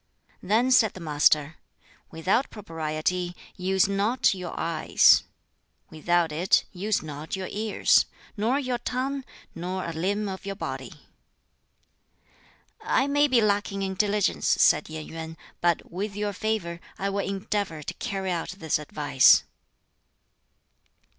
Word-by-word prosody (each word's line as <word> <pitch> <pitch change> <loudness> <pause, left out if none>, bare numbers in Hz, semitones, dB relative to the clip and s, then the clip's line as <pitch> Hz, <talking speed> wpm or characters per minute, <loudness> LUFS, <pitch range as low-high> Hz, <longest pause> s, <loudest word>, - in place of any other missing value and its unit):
Then 230 +6 +2
said 225 -5 +4
the - - -8
Master, 150 -1 +2 0.5
"Without 190 +11 0
Propriety 170 -1 -3 0.2
use 190 +1 +2
not 205 +6 +2
your 180 -2 -6
eyes; 165 -2 +4 0.7
without 170 +1 +1
it 170 +5 +2
use 200 +1 -1
not 150 +2 -6
your 190 -1 -5
ears, 215 0 +2 0.3
nor 230 +5 +1
your 255 -4 -2
tongue, 265 +3 -3 0.3
nor 180 +2 -4
a 170 - -4
limb 200 +6 -1
of 190 0 -6
your 200 0 -5
body." - - -5 1.9
"I 265 - +2
may 290 +1 +3
be 255 -4 +3
lacking 200 -1 0
in 190 0 -2
diligence," 205 0 0
said 150 - +4
Yen 155 -1 -6
Yuen, 160 0 -7 0.2
"but 170 -1 0
with 195 +3 -4
your 205 0 -2
favor 200 -5 -2 0.2
I 195 +1 -2
will 200 - -2
endeavor 195 -4 -3
to - - -5
carry 195 -5 -3
out 175 +1 -3
this 160 -4 0
advice." 145 -2 +4
190 Hz, 130 wpm, -26 LUFS, 165-210 Hz, 1.9 s, said